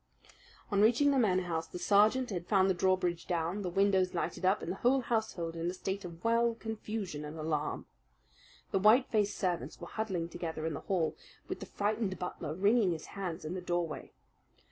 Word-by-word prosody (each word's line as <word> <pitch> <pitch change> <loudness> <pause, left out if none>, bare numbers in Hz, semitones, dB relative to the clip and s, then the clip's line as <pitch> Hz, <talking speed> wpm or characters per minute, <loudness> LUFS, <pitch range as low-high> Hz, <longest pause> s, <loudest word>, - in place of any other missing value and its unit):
On 200 0 +3
reaching 240 +7 +5
the 275 - +3
Manor 185 -6 +3
House, 165 -2 -2
the - - -7
sergeant 210 +7 +3
had 175 -2 -4
found 195 -2 +4
the 190 - +3
drawbridge 180 -2 +1
down, 175 +3 -1
the 185 - -2
windows 190 0 +2
lighted 175 - -2
up, 190 +3 +3
and 170 - -3
the 190 - -4
whole 260 +2 +3
household 215 -9 -2
in 165 +1 -1
a 180 - -4
state 190 +2 -3
of 170 -1 -9
wild 230 0 +2
confusion 215 -7 -4
and 150 +2 -7
alarm. 155 -1 -2 0.9
The 195 - +2
white 220 +7 +5
faced 210 -2 +1
servants 175 -7 -2
were 175 - -7
huddling 185 -4 -2
together 160 -2 -4
in 160 - -1
the - - -4
hall, 180 -5 0 0.3
with - - -4
the - - -7
frightened 205 -2 -1
butler 160 -3 -4
wringing 200 0 +3
his 160 - -6
hands 180 -4 -4
in 155 - -3
the 185 - -4
doorway. 175 -3 -2
185 Hz, 195 wpm, -32 LUFS, 170-210 Hz, 0.9 s, reaching